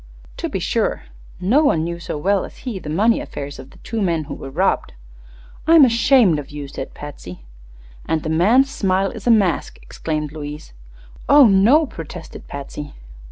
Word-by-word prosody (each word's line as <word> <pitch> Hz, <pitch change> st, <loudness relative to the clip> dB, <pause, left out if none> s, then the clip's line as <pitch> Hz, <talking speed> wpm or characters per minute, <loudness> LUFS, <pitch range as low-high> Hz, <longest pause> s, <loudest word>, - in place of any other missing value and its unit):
"To -, -, -3 dB
be -, -, -3 dB
sure. -, -, -1 dB, 0.4 s
No 240 Hz, +12 st, +3 dB
one 165 Hz, -, +2 dB
knew 170 Hz, +1 st, -4 dB
so 165 Hz, -, -5 dB
well 195 Hz, +5 st, +1 dB
as -, -, -10 dB
he 230 Hz, -7 st, -4 dB
the 150 Hz, -, -8 dB
money 215 Hz, +9 st, +2 dB
affairs 140 Hz, 0 st, -7 dB
of 135 Hz, -, -11 dB
the -, -, -18 dB
two 225 Hz, -2 st, -3 dB
men 170 Hz, -5 st, 0 dB
who -, -, -7 dB
were 135 Hz, -, -8 dB
robbed." 180 Hz, +8 st, 0 dB, 0.7 s
"I'm 325 Hz, -3 st, +8 dB
ashamed 235 Hz, -, +4 dB
of 145 Hz, -, -8 dB
you," 145 Hz, -1 st, -7 dB
said 135 Hz, 0 st, -8 dB
Patsy. 90 Hz, -, -10 dB, 0.6 s
"And 160 Hz, -1 st, -1 dB
the 155 Hz, -, -3 dB
man's 225 Hz, +12 st, +3 dB
smile 195 Hz, -7 st, 0 dB
is -, -, -9 dB
a -, -, +4 dB
mask!" 200 Hz, -7 st, +2 dB
exclaimed 150 Hz, -2 st, -4 dB
Louise. 150 Hz, -, -8 dB, 0.6 s
"Oh, 285 Hz, -1 st, +8 dB
no!" 225 Hz, +10 st, +5 dB
protested 165 Hz, -, -10 dB
Patsy. 140 Hz, +1 st, -8 dB
175 Hz, 175 wpm, -20 LUFS, 150-230 Hz, 0.7 s, I'm